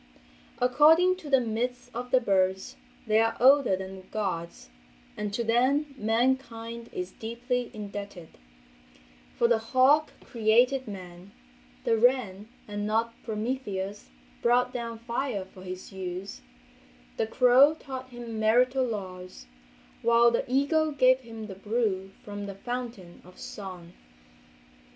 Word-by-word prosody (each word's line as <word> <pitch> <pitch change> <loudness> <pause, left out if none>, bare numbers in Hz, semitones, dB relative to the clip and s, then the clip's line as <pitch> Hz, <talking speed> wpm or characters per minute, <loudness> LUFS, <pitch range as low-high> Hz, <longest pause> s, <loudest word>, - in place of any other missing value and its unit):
According 320 +8 +5
to 325 -6 -10
the 270 -2 +5
myths 245 +1 -3
of 245 +2 -5
the 255 - +4
birds 190 -4 0 0.3
they 215 -1 +3
are 225 0 +1
older 270 -4 +5
than 190 0 -7
the 185 - -14
gods 170 - -4 0.4
and 210 -1 -3
to 235 +4 -2
them 265 +6 +2
mankind 235 0 -1
is 180 +1 -5
deeply 240 +3 -3
indebted; 200 -5 -7 1.1
for 235 - +4
the 235 -1 +3
hawk 260 +6 +3
created 240 +3 +2
man, 185 -1 -10 0.5
the 225 - +2
wren, 220 -5 +2 0.2
and 205 0 -3
not 225 +2 0
Prometheus, 210 -3 -4 0.3
brought 245 +1 +2
down 235 -2 -4
fire 235 -3 -3
for 190 0 -15
his 185 0 -8
use, 185 0 -6 0.8
the 220 - 0
crow 255 +5 +5
taught 260 -4 -8
him 240 -3 -7
marital 250 +4 +3
laws, 185 - -6 0.6
while 235 0 +5
the 235 +1 -2
eagle 305 +4 +2
gave 255 -2 +4
him 225 -3 -9
the 205 - -7
brew 200 -1 -1
from 205 -1 -6
the 200 - -7
fountain 235 -5 -6
of 180 +1 -17
song. 180 -4 -9
230 Hz, 130 wpm, -28 LUFS, 200-250 Hz, 1.1 s, According